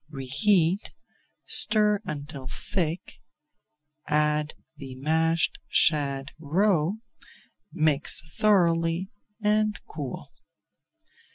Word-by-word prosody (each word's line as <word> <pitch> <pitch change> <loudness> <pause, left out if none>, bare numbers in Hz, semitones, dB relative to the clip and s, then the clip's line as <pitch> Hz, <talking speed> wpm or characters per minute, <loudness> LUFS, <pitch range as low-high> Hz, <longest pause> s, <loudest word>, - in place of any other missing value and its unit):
Reheat, 160 +7 +1 0.5
stir 210 -1 +3
until 145 -2 -6
thick, 165 +4 -3 0.9
add 150 0 +1 0.2
the 135 -3 -8
mashed 160 +4 +1
shad 140 -3 +1
roe, 170 +2 +1 0.8
mix 155 -3 0 0.2
thoroughly, 170 -3 +2 0.3
and 210 0 +1
cool. 145 -5 -7
160 Hz, 70 wpm, -26 LUFS, 145-190 Hz, 0.9 s, stir